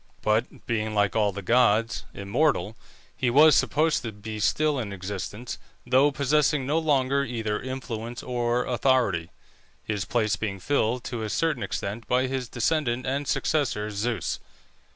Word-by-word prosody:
But 110 +3 0
being, 110 -2 -1
like 100 -1 +2
all 105 -2 +3
the 100 +1 -7
gods, 115 +1 +2
immortal, 105 - 0 0.4
he 125 - 0
was 150 +5 +7
supposed 155 +1 +2
to 115 - -5
be 105 +1 -7
still 145 +7 +2
in 110 -5 -4
existence, 100 +4 -5 0.3
though 140 +3 +4
possessing 140 0 +2
no 150 +4 +1
longer 140 -3 +2
either 110 -4 -2
influence 120 -3 -5
or 120 0 0
authority, 120 -9 +1 0.5
his 105 -3 -2
place 110 -3 +1
being 100 -2 -3
filled 120 +2 0
to 115 +1 -4
a 110 - -3
certain 155 0 0
extent 105 +4 -4
by 125 +1 +2
his 130 -2 -3
descendant 125 -1 0
and 140 +2 -2
successor, 110 -9 0
Zeus. 110 +3 -2
120 Hz, 150 wpm, -26 LUFS, 105-135 Hz, 0.5 s, was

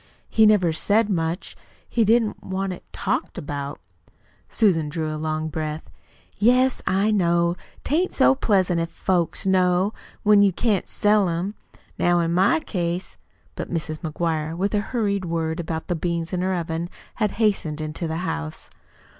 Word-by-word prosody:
"He 220 -1 +5
never 185 -6 +4
said 210 +6 +2
much. 165 -1 -2 0.3
He 235 - +2
didn't 225 0 +2
want 190 0 -2
it - - -11
talked - - -2
about." 145 -1 -5 0.7
Susan 170 -9 +2
drew 155 0 -3
a - - -3
long 155 0 -2
breath. 155 0 -5 0.5
"Yes, 250 +5 +3
I 195 +3 +2
know. 170 -3 +2 0.3
'Tain't 340 +6 +1
so 265 - +4
pleasant 190 -9 +2
if 165 - -2
folks 175 -1 0
know 185 +1 +3 0.3
when 210 -1 +6
you 200 -1 +5
can't 205 0 0
sell 205 -2 +2
'em. 175 +5 -2 0.5
Now 175 0 +3
in 165 0 0
my 195 - +3
case 175 - -3 0.2
" - - -36
But - - -5
Mrs. 155 -2 -2
McGuire, 160 -1 -2
with 200 +4 0
a 210 - +3
hurried 205 -4 -1
word 165 -1 -2
about 160 -1 -3
the 175 - 0
beans 170 +1 -2
in 180 - 0
her 185 0 0
oven, 170 0 -3 0.3
had 210 -3 0
hastened 195 -9 0
into 155 +2 -4
the 160 0 -3
house. 75 - -5
180 Hz, 165 wpm, -23 LUFS, 160-205 Hz, 0.7 s, when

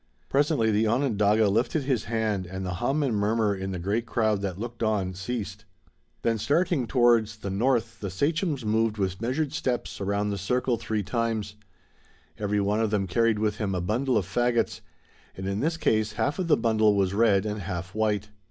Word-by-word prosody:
Presently 140 -5 +2
the 110 +1 +2
Onondaga 110 -3 +2
lifted 115 +9 +1
his 130 -5 0
hand 110 -4 -1
and 95 +1 -5
the 90 - -2
hum 140 +5 +1
and 125 -6 0
murmur 105 0 +1
in 95 0 -4
the 95 - -3
great 105 +7 -1
crowd 110 -4 +1
that 95 -3 -3
looked 120 +2 -6
on 105 -4 0
ceased. 105 +1 -5 0.6
Then 115 -1 +1
starting 150 - +1
towards 115 -3 +3
the 100 -2 -5
north 115 +2 0
the 100 - -4
sachems 145 - -1
moved 110 0 +1
with 95 -1 -2
measured 135 +5 -1
steps 125 -8 -2
around 100 +1 0
the 100 - -3
circle 125 +6 0
three 110 -2 -2
times. 110 -2 -2 0.9
Every 105 0 0
one 100 +2 +1
of 110 -1 +1
them 105 -2 0
carried 110 +4 +2
with 105 0 0
him 100 -4 -2
a - - 0
bundle 120 +7 0
of 100 - 0
fagots, 120 +4 0 0.6
and 95 0 -4
in 100 +1 -1
this 160 +5 0
case 110 -7 +1
half 115 - -1
of 180 - -1
the 150 - +4
bundle 110 -2 +3
was 95 -1 +1
red 105 -2 +3
and 105 -1 -3
half 90 0 -5
white. 105 -1 0
110 Hz, 190 wpm, -26 LUFS, 100-120 Hz, 0.9 s, the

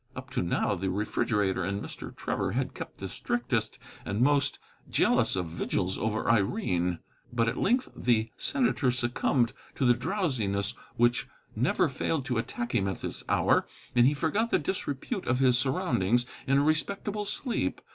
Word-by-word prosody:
Up 130 +1 -8
to 130 - 0
now 85 +3 +1
the 95 0 -2
refrigerator 105 -1 0
and 100 +3 -1
Mr. - - -7
Trevor - - -2
had - - -1
kept - - -8
the - - -5
strictest 120 -2 -2 0.3
and 100 +2 -3
most 140 +2 +3 0.3
jealous - - +3
of 90 -1 -1
vigils 90 +3 -2
over 110 0 -1
Irene. 95 - +1 0.3
But 115 -1 +1
at 120 - 0
length 250 +5 +2
the 115 -2 +1
senator 245 - +1
succumbed 120 0 +1 0.2
to 130 - 0
the 120 - +6
drowsiness 120 - -1 0.2
which 120 +2 +2 0.3
never 130 - +2
failed 135 +1 -1
to 125 -2 0
attack 120 +1 -4
him 100 -5 +2
at 95 - -3
this - - -3
hour, - - +3 0.3
and 120 0 +6
he 145 - +2
forgot 200 +11 +1
the - - +3
disrepute 180 - -3
of 125 - +2
his 130 -2 +4
surroundings 125 - +1 0.2
in 135 +1 +4
a 140 - +4
respectable 200 +7 0
sleep. 240 +4 -1
120 Hz, 165 wpm, -29 LUFS, 105-145 Hz, 0.3 s, the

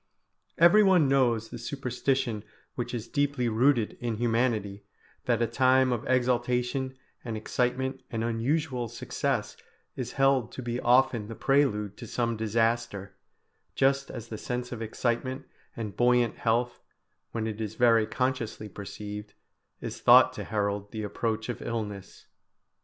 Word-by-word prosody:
Everyone 180 -2 +6
knows 120 -5 +2
the 120 - -8
superstition 125 -3 -2 0.3
which 120 -1 -4
is 120 -3 -4
deeply 140 -3 0
rooted 115 0 +2
in 120 -2 -2
humanity, 115 -3 0 0.4
that - - +2
a - - +3
time 130 +2 +3
of 120 - -4
exaltation 125 +1 0 0.3
and 115 -3 -4
excitement 130 +4 -1
and 115 -1 -2
unusual 120 +2 -1
success 120 +1 -2 0.4
is 125 -1 -5
held 135 -3 +2
to 130 - -6
be 120 0 -2
often 120 -3 +3
the 115 - -7
prelude 105 -8 +1
to 120 - -8
some 115 +1 -1
disaster, 110 -2 -1 0.6
just 135 0 +2
as 120 -2 -8
the 110 - -6
sense 125 0 -4
of 120 -2 -5
excitement 125 +4 -2 0.3
and 110 -3 -5
buoyant 120 -1 +3
health, 120 +2 0 0.5
when 115 -1 -2
it 110 0 -4
is 110 0 -4
very 115 -3 +4
consciously 120 -3 -2
perceived, 105 +1 -8 0.5
is - - -6
thought - - +7
to - - -6
herald 100 -1 -2
the 110 -1 -4
approach 110 +1 -2
of 120 - -5
illness. 105 -4 -5
120 Hz, 140 wpm, -28 LUFS, 110-130 Hz, 0.6 s, thought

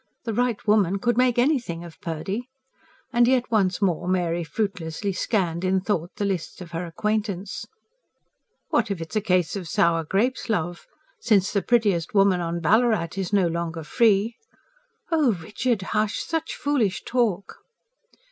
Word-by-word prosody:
The 225 - -3
right 240 -1 0
woman 200 -3 +3
could 240 +3 +1
make 250 -1 +3
anything 240 - +1
of 170 -2 -12
Purdy"; 190 +8 -4 0.6
and 240 0 +5
yet 250 -1 +2
once 200 -3 +2
more 175 -2 0
Mary 175 -2 0
fruitlessly 185 +1 -3
scanned, 180 -3 -1
in 190 0 +2
thought, 185 -3 -1
the 205 - -2
lists 190 -5 -3
of 175 -2 -9
her 170 +1 -4
acquaintance. 205 +1 -2 1.0
"What - - +1
if 200 -4 -2
it's 165 +3 -7
a 215 - +2
case 185 -5 +1
of 190 -4 -5
sour 170 -2 +2
grapes, 230 +10 0
love? 175 -5 -2 0.3
Since 205 -5 +2
the 200 - +2
prettiest 205 -5 +1
woman 195 -2 +4
on 170 0 -2
Ballarat 215 0 +3
is 195 -1 -3
no 200 -3 +3
longer 165 -1 -3
free...." 220 +5 +2 0.7
"Oh, 300 -8 +3
Richard, 210 +5 -2
hush! 215 0 0
Such 325 -1 -3
foolish 235 -11 0
talk!" 225 -6 -1
195 Hz, 155 wpm, -24 LUFS, 175-225 Hz, 1.0 s, and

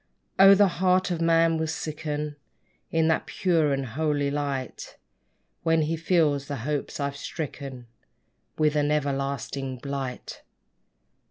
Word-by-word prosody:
Oh! 195 +1 +9
the 200 0 +5
heart 185 0 +3
of 170 -1 -2
man 165 0 +3
will 160 - -1
sicken 150 -1 -4 0.5
In 160 -1 +2
that 160 - +1
pure 165 -5 +1
and 135 -1 -1
holy 145 +2 -1
light, 140 -3 -4 0.6
When 165 -1 +2
he 160 +2 -1
feels 155 -4 +1
the 145 - -3
hopes 150 0 -3
I've 140 0 -2
stricken 140 -4 -6 0.7
With 155 -1 +2
an 145 0 +2
everlasting 140 -2 -2
blight! 135 -1 -5
150 Hz, 125 wpm, -26 LUFS, 140-165 Hz, 0.7 s, Oh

